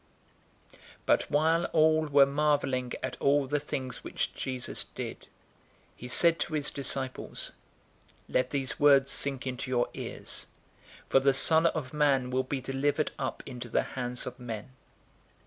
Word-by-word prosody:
But - - +2
while 160 +3 +2
all 155 0 +4
were 140 -1 +6
marveling 140 -3 0
at - - -3
all 140 0 +3
the 145 +2 0
things 130 -3 -5
which - - -3
Jesus 130 -2 -3
did, - - -7 0.7
he 125 - -9
said 165 +6 +5
to 155 - -2
his 150 -1 -1
disciples, 135 -1 -3 0.8
009:044 - - -16
"Let 125 0 +2
these 135 0 -3
words 140 -2 +5
sink 135 -1 0
into 130 0 -4
your 120 -1 +1
ears, - - -5 0.6
for - - +4
the 135 0 +3
Son 160 +4 +5
of 155 -5 -3
Man 140 -4 +2
will 130 +1 +2
be 130 +1 -3
delivered 140 +3 0
up 130 - -3
into 125 -2 -7
the - - +1
hands 125 -1 -1
of 125 0 -7
men." 115 -1 -6
135 Hz, 150 wpm, -29 LUFS, 130-145 Hz, 0.8 s, were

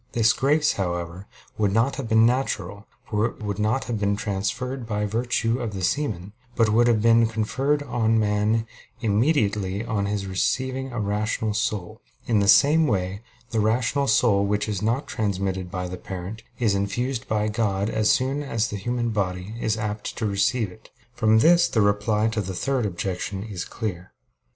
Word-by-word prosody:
This 115 -1 +4
grace, 150 +3 +2
however, 90 0 -4 0.3
would 105 -2 +2
not 120 +6 +1
have 130 -5 -4
been 110 0 +5
natural, 110 -5 -1 0.2
for 110 0 +1
it 115 - -10
would 100 -1 -3
not 110 +5 +1
have 115 -3 -3
been 100 0 +1
transfused 110 +6 -3
by 105 -1 -1
virtue 115 +2 0
of 115 -5 -4
the 95 - -4
semen; 105 -6 -1 0.2
but 115 -2 +3
would 120 +3 +4
have 110 -3 +2
been 115 0 +5
conferred 135 +7 0
on 115 -5 +1
man 105 +1 +1 0.4
immediately 105 -4 +1
on 105 -4 -1
his 100 -1 -2
receiving 130 +7 -1
a 120 - -4
rational 105 +1 -1
soul. 110 -1 -2 0.2
In 115 -3 +2
the 100 - +1
same 150 +8 +6
way 95 -3 -1 0.3
the 115 - 0
rational 125 +6 +1
soul, 105 -3 +3
which 105 +1 0
is 100 -3 -2
not 115 +6 0
transmitted 95 -3 -2
by 90 0 -4
the 90 +1 -6
parent, 95 +4 -7 0.2
is 110 -5 +2
infused 115 +6 -2
by 105 -1 0
God 105 -2 0
as 110 -1 +1
soon 135 +3 +1
as 115 -5 -1
the 105 - -4
human 120 +3 -2
body 95 -1 -2
is 110 0 0
apt 105 -1 -4
to 110 - -1
receive 100 +1 +1
it. 110 +4 -17 0.2
From 110 -1 +3
this 170 +8 +5
the 110 - 0
reply 105 +1 +2
to 110 -1 -1
the 95 -1 -5
third 130 +2 0
objection 95 +1 -4
is 100 -5 -5
clear. 90 -6 -5
110 Hz, 180 wpm, -24 LUFS, 100-120 Hz, 0.4 s, same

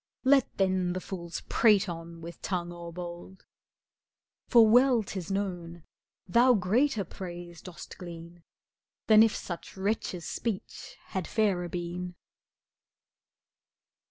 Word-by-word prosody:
Let 270 -1 +3
then 185 -2 +1
the 185 - -2
fools 170 -3 -6
prate 210 -4 +4
on 165 -1 -7
with 170 +1 -9
tongue 175 -2 -2
o'erbold, 175 +2 -8 1.0
For 235 -3 +7
well 245 0 +5
'tis 190 -3 -6
known, 175 -4 -3 0.4
thou 240 +6 +5
greater 220 +4 +2
praise 175 -2 -8
dost 180 -2 -10
glean 170 -1 -9 0.6
Than 215 -1 +7
if 225 -1 +4
such 175 +1 -7
wretches' 190 -3 -2
speech 220 -5 -5
had 190 -3 -3
fairer 195 -6 +1
been. 175 +1 -5
185 Hz, 110 wpm, -29 LUFS, 175-215 Hz, 1.0 s, For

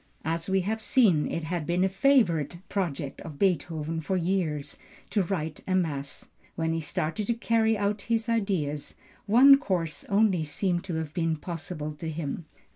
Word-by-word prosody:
As 165 +2 -2
we 190 0 +3
have 220 +4 -2
seen, 210 - +3
it 165 - -3
had 160 -1 -3
been 175 +1 +2
a - - +4
favorite 190 - +2
project 155 -8 -3
of 150 -3 -8
Beethoven 165 -3 0
for 185 +4 -1
years 170 -5 -1 0.3
to 210 - +2
write 160 -4 -3
a 185 - +1
mass. 145 -6 -2 0.3
When 160 0 0
he 165 - -1
started 160 +7 -2
to 235 - +1
carry 225 -1 +2
out 205 +1 0
his 230 0 +1
ideas, 190 -11 -1 0.3
one 270 +6 +8
course 175 - -2
only 200 -4 +3
seems 175 +3 -1
to 170 - -1
have 160 -2 -4
been 165 -2 0
possible 155 -1 -5
to 165 - -4
him. 160 0 -4
175 Hz, 170 wpm, -27 LUFS, 160-200 Hz, 0.3 s, one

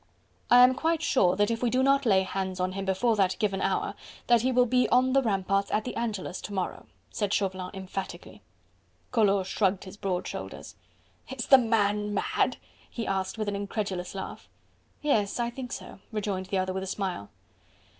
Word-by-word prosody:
"I 245 +1 +8
am 250 +1 +6
quite 325 +3 0
sure 185 - +3
that 205 +3 +2
if 230 - -2
we 245 - +2
do 255 +2 +2
not 275 -1 +3
lay 190 -3 +4
hands 190 0 -3
on 185 0 0
him 195 +1 -4
before 205 +5 +2
that 190 -2 +2
given 195 -3 0
hour, 195 - 0 0.3
that 240 -2 +4
he 260 +2 +1
will 250 0 +4
be 250 +1 +2
on 255 +1 +3
the 275 - +5
ramparts 195 -3 0
at 215 - 0
the 250 - -5
Angelus 210 -6 -3
to 205 - -7
morrow," 190 -2 -3 0.2
said 205 -2 -2
Chauvelin 190 -3 -1
emphatically. 190 0 -7 0.7
Collot 200 -5 +3
shrugged 190 0 0
his 195 +1 -10
broad 185 -3 -2
shoulders. - - -7 0.5
"Is 260 -3 -4
the 270 - +8
man 210 -3 +1
mad?" - - 0 0.3
he 230 - -4
asked 190 +2 -2
with 215 -1 -2
an 205 - -1
incredulous 200 -2 -3
laugh. 190 - -7 0.5
"Yes, 220 -8 +1
I 240 0 0
think 250 0 -7
so," - - -7
rejoined 200 -3 -3
the 195 - -1
other 185 0 -1
with 190 - -3
a 190 - -5
smile. 185 - -3
205 Hz, 190 wpm, -28 LUFS, 190-240 Hz, 0.7 s, I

